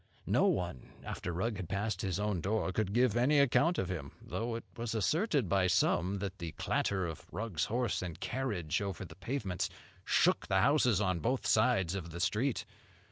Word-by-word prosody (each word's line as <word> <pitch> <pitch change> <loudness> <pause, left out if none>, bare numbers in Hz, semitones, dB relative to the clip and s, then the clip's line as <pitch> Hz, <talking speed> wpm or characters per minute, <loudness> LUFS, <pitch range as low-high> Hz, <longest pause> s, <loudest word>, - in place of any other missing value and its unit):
No - - +3
one, 85 -8 -2
after - - -4
Rugg 100 +6 -1
had 90 -4 -6
passed 100 -1 -1
his 95 -1 -1
own 105 -4 0
door, 100 +2 0
could 100 0 -1
give 120 0 +3
any 130 +5 +4
account 150 +6 +4
of 90 - -1
him; 80 -7 -5
though 115 +1 -3
it 115 - -5
was 115 -1 -3
asserted 145 - +1
by 95 0 +3
some 90 +2 +2
that 95 0 -5
the 85 -3 -5
clatter 95 +3 0
of 80 -3 -7
Rugg's 90 -4 -2
horse 120 +1 0
and 85 -4 -5
carriage 105 -11 -2
over 100 -3 -4
the - - -11
pavements 115 -8 -2 0.3
shook - - +3
the 95 0 +3
houses 125 -4 +4
on 95 -4 +1
both 125 - -1
sides 95 -9 +3
of 90 -4 -4
the 85 +2 -7
street. 105 +8 0
100 Hz, 190 wpm, -33 LUFS, 90-120 Hz, 0.3 s, any